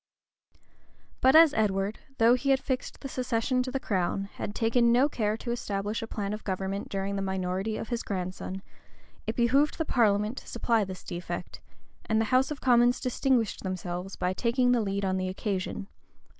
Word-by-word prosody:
But 260 +2 +5
as 320 -2 +8
Edward, 200 -1 0 0.2
though 230 +1 +6
he 255 +2 0
had 270 -1 +4
fixed 260 -1 -4
the 275 - -5
succession 250 -1 0
to 255 - -3
the 270 +1 -2
crown, 195 -2 -1
had 205 - -5
taken 235 +1 +3
no 250 +4 +5
care 215 -6 -1
to 235 - -4
establish 210 -2 -2
a 225 - -5
plan 205 -2 -3
of 215 - -6
government 190 +1 -3
during 195 0 -2
the 195 - -1
minority 190 +2 -2
of 225 - -6
his 235 -1 -1
grandson, 185 0 -4 0.6
it 220 - -1
behoved 270 +5 +3
the 320 - -1
parliament 215 -2 +2
to - - -18
supply 230 -3 +1
this 190 -2 -7
defect; 175 -1 -6 0.5
and 220 0 +2
the 225 - +2
house 260 +1 +4
of 300 -3 -5
commons 245 0 +4
distinguished 250 -2 0
themselves 185 0 -4
by 180 0 -1
taking 245 +4 +2
the 245 -2 +3
lead 200 -1 -1
on 190 0 0
the 185 0 -1
occasion. 190 0 -3
220 Hz, 185 wpm, -28 LUFS, 195-245 Hz, 0.6 s, as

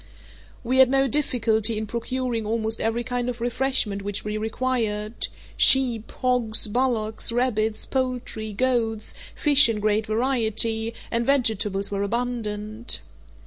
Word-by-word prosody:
We 255 +2 +1
had 260 -1 +7
no 270 0 +3
difficulty 230 -5 +1
in 220 - -3
procuring 235 +1 -3
almost 220 +1 -1
every 225 +2 0
kind 245 0 -2
of 245 -1 -5
refreshment 240 -4 0
which 205 +1 -4
we 210 0 -3
required—sheep, 225 +1 +1
hogs, 250 -4 +1
bullocks, 225 -2 0
rabbits, 225 -3 0
poultry, 250 -4 -3
goats, 225 -1 -1 0.2
fish 290 -4 +5
in 220 -2 -1
great 215 +1 0
variety, 225 -1 0 0.2
and 235 0 0
vegetables 220 -7 0
were 200 0 -2
abundant. 215 0 -2
230 Hz, 120 wpm, -24 LUFS, 215-250 Hz, 0.2 s, had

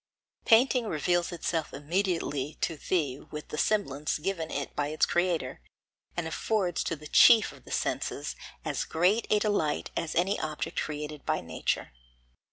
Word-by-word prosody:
Painting 245 +1 +5
reveals 175 +1 +1
itself 165 -2 -2
immediately 155 -2 -1
to 165 - -1
thee 145 -5 -1
with 150 0 -9
the 150 - -5
semblance 150 -9 +1
given 165 0 -2
it 140 -1 -4
by 145 - 0
its 155 +1 +2
creator, 175 - 0 0.6
and 170 -2 -1
affords 180 +1 0
to 165 - -2
the 150 0 -13
chief 225 +8 +7
of - - -16
the - - -11
senses - - -2 0.3
as - - -1
great 185 +8 +2
a 210 - +4
delight 205 -8 0
as 160 - -2
any 185 +4 +2
object 155 -1 -3
created 150 -1 -5
by 155 0 0
nature. 80 -5 -2
160 Hz, 155 wpm, -29 LUFS, 150-190 Hz, 0.6 s, chief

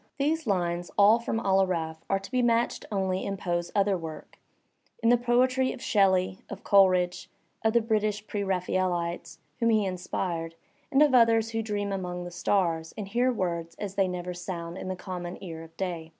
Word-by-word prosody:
These 305 0 0
lines, 175 -3 0
all 210 +3 +6
from 230 -1 -2
"Al 195 -2 +3
Aaraaf," 165 -4 -2
are 195 - +3
to 195 +4 -10
be 255 -1 +2
matched 235 0 +1
only 190 -2 -1
in 195 0 -3
Ppe's 175 -2 -2
other 200 -1 +3
work, 165 -3 -8 0.6
in 230 - +4
the 245 - +7
poetry 255 +2 +2
of - - -10
Shelley, 190 -5 +2
of 200 - -8
Coleridge, 185 -3 +3 0.3
of 220 0 +2
the 235 - +4
British 215 -2 0
pre 205 -1 -3
RaphaeUtes 180 -2 -1 0.2
whom 230 -1 +3
he 215 -2 +3
inspired, 175 -2 -3 0.4
and 285 +1 +6
of 295 -3 +3
others 230 -2 +4
who 225 0 -1
dream 205 -2 -2
among 180 -2 -3
the 175 - -7
stars 170 -3 0
and 205 -2 -5
hear 245 +4 +2
words 170 -6 -3
as 200 -2 -5
they 195 -1 +2
never 180 0 -4
sound 175 -1 -6
in 185 - -6
the 185 - -2
common 180 -1 -6
ear 165 -3 -7
of 165 0 -14
day. 170 -4 -4
190 Hz, 190 wpm, -28 LUFS, 175-220 Hz, 0.6 s, the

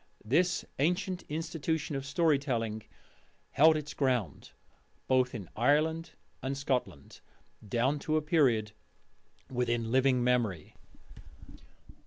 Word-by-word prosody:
This 170 +10 +1
ancient 180 +4 0
institution 160 -1 -2
of 135 0 -4
story 150 0 +2
telling 115 -6 -2 0.7
held 155 +2 +5
its 150 -1 -6
ground 125 - -1 0.6
both 130 -1 +2
in 100 -6 -6
Ireland 155 +7 +1 0.3
and 135 +1 -3
Scotland 125 - -3 0.5
down 130 +6 +1
to 155 +2 0
a - - +1
period 130 -10 +2 0.8
within 120 -2 -1
living 130 -1 +3
memory. 115 -10 0
135 Hz, 105 wpm, -30 LUFS, 120-155 Hz, 0.8 s, held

